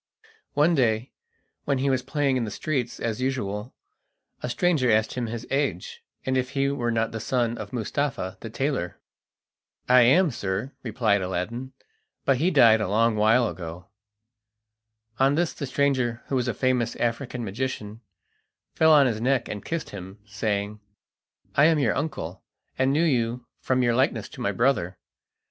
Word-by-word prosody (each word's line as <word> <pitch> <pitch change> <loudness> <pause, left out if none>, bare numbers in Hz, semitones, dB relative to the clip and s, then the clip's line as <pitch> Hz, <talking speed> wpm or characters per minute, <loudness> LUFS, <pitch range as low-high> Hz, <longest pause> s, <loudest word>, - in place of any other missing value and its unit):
One 150 +4 +4
day, 120 -4 +1 0.5
when 140 -2 +1
he 135 +1 +1
was 130 -1 +1
playing 145 -1 0
in 125 - 0
the 110 - -3
streets 125 0 -3
as 115 +1 -2
usual, 120 -4 -3 0.7
a - - -3
stranger 155 -3 +2
asked 110 0 +2
him 125 -2 -2
his 115 +1 -5
age, 150 - -2 0.2
and 130 - 0
if 130 -1 0
he 140 0 0
were 125 -4 -1
not 115 -1 0
the 110 - -4
son 120 0 0
of - - -7
Mustapha 120 -5 -2
the 115 - -7
tailor. 130 -6 -2 0.9
"I 125 0 +7
am, 155 +8 +5
sir," 100 +3 -3
replied 110 -4 +1
Aladdin; 115 +8 -4 0.5
"but 135 -2 +3
he 165 +7 +2
died 115 -9 +6
a 105 - 0
long 110 +3 +2
while 110 +3 +4
ago." 85 0 -7 1.3
On 135 +2 +4
this 170 +1 0
the 140 - -5
stranger, 130 -4 0
who 135 - 0
was 125 -1 0
a 120 - 0
famous 125 -1 0
African 120 0 -2
magician, 110 0 -4 0.7
fell 160 0 +4
on 145 -3 +7
his 115 -4 -1
neck 130 0 +1
and 105 -1 -6
kissed 165 -1 -4
him, 95 0 -9
saying: 105 0 -2 0.8
"I 145 - +6
am 160 0 +5
your 130 -8 +2
uncle, 130 - -4 0.3
and 130 +1 +2
knew 155 +4 +2
you 120 -4 0
from 130 -1 +1
your 120 -1 +3
likeness 120 -4 +1
to - - -10
my 100 - +1
brother. 100 -5 +1
125 Hz, 165 wpm, -25 LUFS, 110-135 Hz, 1.3 s, I